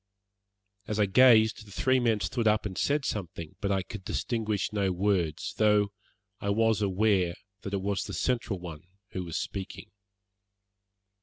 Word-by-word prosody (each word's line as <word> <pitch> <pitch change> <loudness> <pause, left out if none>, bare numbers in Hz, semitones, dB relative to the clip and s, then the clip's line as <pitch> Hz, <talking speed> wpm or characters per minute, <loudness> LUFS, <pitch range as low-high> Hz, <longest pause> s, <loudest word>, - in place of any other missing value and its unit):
As 105 0 -2
I 105 - +5
gazed 110 0 +5
the - - -13
three 130 +6 +2
men 115 -4 +1
stood 110 +5 -1
up 105 0 +2
and 95 -3 -4
said 145 +5 0
something, 85 -5 -5
but 100 - 0
I 95 -1 +1
could 95 +3 -9
distinguish 110 -1 -2
no 100 -2 +1
words, 90 -4 0
though 105 -2 +3 0.5
I 100 - -3
was 110 +1 +2
aware 95 -3 +2 0.3
that 100 0 -4
it 95 - -3
was 100 -1 -1
the - - -6
central 120 -5 -1
one 85 -4 -8 0.3
who 95 - -4
was 85 -2 -4
speaking. 95 -2 -6
100 Hz, 160 wpm, -28 LUFS, 95-110 Hz, 0.5 s, I